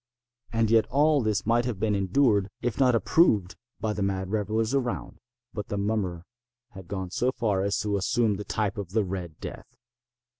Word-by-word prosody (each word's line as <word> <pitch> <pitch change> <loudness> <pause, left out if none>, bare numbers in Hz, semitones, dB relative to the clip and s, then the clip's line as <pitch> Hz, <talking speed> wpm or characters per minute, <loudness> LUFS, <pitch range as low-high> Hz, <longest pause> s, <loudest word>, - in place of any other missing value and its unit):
And 115 -1 +1
yet 115 -1 +4
all 145 +1 +3
this 110 -3 0
might 120 +2 +2
have 120 -6 -3
been 105 0 +1
endured, 100 +1 +2
if 120 -1 -3
not 130 -3 +4
approved, 110 - +3 0.2
by 110 -1 -1
the 105 - -4
mad 95 -1 -1
revellers 110 +2 0
around. 125 -3 -2 0.3
But 105 -2 -5
the 100 - -3
mummer 100 -4 -1 0.5
had 95 -4 -11
gone 95 -2 -4
so 125 +6 +1
far 110 -7 0
as 100 +1 0
to 105 -1 0
assume 110 +1 +1
the 105 - -5
type 105 -1 -2
of 95 -2 -6
the 110 -1 +3
Red 90 -4 -5
Death. - - -9
105 Hz, 185 wpm, -27 LUFS, 95-115 Hz, 0.5 s, yet